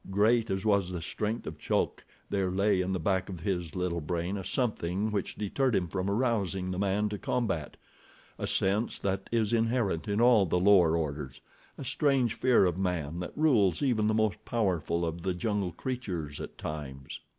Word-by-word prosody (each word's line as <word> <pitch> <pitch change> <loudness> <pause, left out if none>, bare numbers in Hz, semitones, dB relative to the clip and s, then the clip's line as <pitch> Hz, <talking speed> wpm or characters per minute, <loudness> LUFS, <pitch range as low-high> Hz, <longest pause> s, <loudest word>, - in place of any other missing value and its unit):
Great 110 +4 +3
as 95 +2 -2
was 100 -4 +3
the 90 -1 -4
strength 105 +7 -3
of 75 0 -7
Chulk - - -1 0.2
there 95 -2 0
lay 100 +1 +2
in 90 +1 -1
the 95 - -1
back 95 +3 0
of 90 -4 -7
his 90 -5 -2
little 90 -2 -1
brain 85 +4 -2
a 95 - -4
something 105 -2 -1
which 100 -3 -2
deterred 120 +4 0
him 90 -2 +1
from 95 +3 -2
arousing 100 -5 0
the 90 - -3
man 100 +1 +1
to 105 -1 -5
combat—a 95 - -5
sense 100 +5 0
that 95 0 -2
is 115 -2 +1
inherent 115 -6 +1
in 100 +1 0
all 115 -5 +5
the 90 - +1
lower 90 -4 +5
orders, 70 -4 -4 0.4
a - - -7
strange 135 -6 +2
fear 125 -4 +4
of 90 0 0
man, 85 -4 -2
that 90 - -6
rules 120 - +3
even 115 -6 +2
the 110 - +2
most 110 -4 0
powerful 85 -6 0
of 85 +1 -4
the 90 0 -1
jungle 100 -1 -1
creatures 90 - -4
at - - -8
times. 70 -3 -6
95 Hz, 185 wpm, -29 LUFS, 85-110 Hz, 0.4 s, all